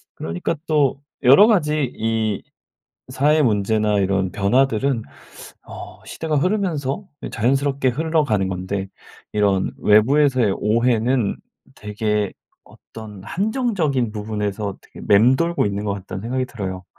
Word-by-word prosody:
그러니까 85 - -3
또 140 -3 +1 0.2
여러 140 - +7
가지 150 - +1
이 110 -2 -1 0.7
사회 145 +4 +2
문제나 105 -2 +1
이런 95 -1 0
변화들은 125 +3 +1 0.6
어 - - -10
시대가 155 -2 -3
흐르면서 175 -3 -1 0.2
이 - - -5
자연스럽게 135 +3 +1
흘러가는 145 - 0
건데 95 +1 -3 0.5
이런 100 -2 +1
외부에서의 125 0 +3
오해는 115 +1 +1 0.4
되게 105 -1 -2 0.3
어떤 105 -4 -12
한정적인 180 - -1
부분에서 105 -2 -3
되게 - - -14
맴돌고 130 +12 +3
있는 100 +1 -3
것 100 - -1
같다는 95 -1 -7
생각이 130 +4 -2
들어요. 95 -6 -6
115 Hz, 285 characters per minute, -21 LUFS, 105-140 Hz, 0.7 s, 여러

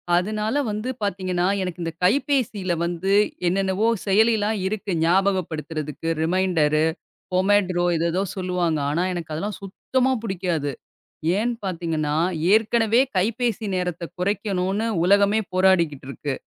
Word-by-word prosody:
அதுனால 215 +7 0
வந்து 215 +4 -3
பாத்தீங்கன்னா, 185 -3 -1 0.2
எனக்கு 180 -1 -4
இந்த 165 - -2
கைப்பேசியில 220 - +1
வந்து 175 +3 -1 0.3
என்னென்னவோ 195 +4 +1 0.2
செயலிலாம் 215 +1 +3
இருக்கு. 205 0 -3
ஞாபகப்படுத்துறதுக்கு 165 -4 -1
ரிமைண்டரு, 160 -3 +2 0.5
பொமைட்ரோ, 185 -1 +2
எதோ 165 +1 0
எதோ 185 - 0
சொல்லுவாங்க. 180 -4 0
ஆனா, 170 +4 0
எனக்கு 170 -3 -5
அதெல்லாம் 200 +6 -3
சுத்தமா 260 +6 -1
பிடிக்காது. 175 -8 -2 0.7
ஏன் 240 +3 0
பாத்தீங்கன்னா, 165 -5 -2 0.4
ஏற்கனவே 225 +1 +3 0.2
கைப்பேசி 230 +3 0
நேரத்தை 180 -1 -2
குறைக்கணுனு 200 +2 -1 0.2
உலகமே 200 +3 +4
போராடிக்கிட்டு 170 -7 +2
இருக்கு. 140 0 -4
185 Hz, 110 wpm, -23 LUFS, 175-210 Hz, 0.7 s, உலகமே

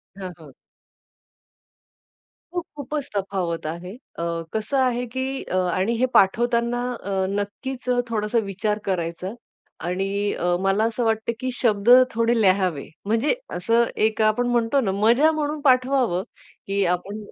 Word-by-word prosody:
हां, 190 -2 -6
हां. 155 -4 -14 2.0
खूप, 350 -2 -1
खूपच 290 0 -4
तफावत 185 -5 -2
आहे. 170 +3 -6 0.3
अ, - - -2 0.3
कसं 220 +5 -1
आहे, 250 -2 +1
की 260 +2 -3
अ, - - -4 0.2
आणि 190 +6 +1
हे 255 - +4
पाठवताना 235 +4 +3
अ, 215 -4 -8 0.2
नक्कीच 245 +6 -4
अ, 245 0 +3
थोडासा 215 0 -1
विचार 210 +2 -2
करायचा 180 +1 -2 0.5
आणि 195 +3 -1
अ, 175 0 0
मला 195 +2 +2
असं 230 +1 0
वाटतं, 220 0 0
की 255 +1 -2
शब्द 220 -3 +1 0.2
थोडे 230 +1 +2
लिहावे. 185 -6 +2 0.2
म्हणजे 230 - +1 0.2
असं 230 +6 +2 0.2
एक 220 0 -3
आपण 215 +3 +2
म्हणतो 240 +2 +2
ना, 195 - 0
मजा 235 +10 +4
म्हणून 305 -1 -2
पाठवावं, 255 - +3 0.4
की 200 0 +1
आपण 180 +4 -1
220 Hz, 140 wpm, -23 LUFS, 195-245 Hz, 2.0 s, हे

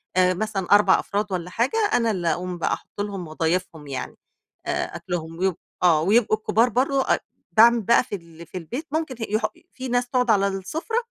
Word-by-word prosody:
آآ 185 0 +4
مثلًا 195 -1 -3
4 205 -2 +6
أفراد 205 0 -2
والّا 180 -1 -3
حاجة، 235 - 0 0.2
أنا 230 -2 +3
اللي 180 -4 -2
اقوم 180 +1 -4
بقى - - 0
احط 205 - -7
لهم 195 -4 -4
واضايفهم 160 -1 -2
يعني، 135 -2 -5 0.5
آآ - - -2
أكلهم، 165 -2 -5
ويبق 190 -2 +1 0.3
آه 160 -3 +5
ويبقوا 215 +4 +3
الكبار 225 +3 +2
برّه 270 +2 +1
أ - - -6 0.3
باعمل 235 +1 +6
بقى 235 +4 +4
في 210 - -5
ال 170 -2 -12
في 175 - -8
البيت 245 - -6
ممكن 315 -4 -2
ه - - 0
يح 215 +1 +1 0.3
في 260 0 -6
ناس 245 0 0
تقعُد 250 -2 +1
على 200 -2 +3
السفرة، 250 - -3
200 Hz, 195 wpm, -24 LUFS, 175-235 Hz, 0.5 s, 4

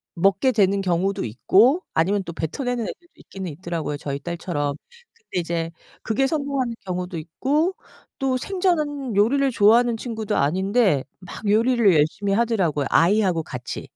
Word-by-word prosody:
먹게 195 +8 +3
되는 200 -3 +2
경우도 190 +2 0
있고 215 - +3
아니면 195 +5 +1
또 170 - -7
뱉어내는 245 - -3
애들도 345 +9 -9
있기는 190 -3 -8
있더라고요, 165 -2 -4
저희 140 -1 -4
딸처럼. 160 -4 -3 0.4
근데 455 - -5
이제 165 -1 -3 0.3
그게 225 +5 +1
성공하는 275 -4 -1
경우도 180 -1 -4
있고 280 - 0 0.4
또 265 -1 0
생전은 300 - -1
요리를 270 +7 +3
좋아하는 230 +2 +4
친구도 220 -3 -3
아닌데 190 - +2 0.2
막 195 +3 -8
요리를 225 -1 +4
열심히 160 +7 +1
하더라고요. 195 - +1
아이하고 180 -1 +3
같이. 125 -1 -7
200 Hz, 355 characters per minute, -23 LUFS, 170-245 Hz, 0.4 s, 좋아하는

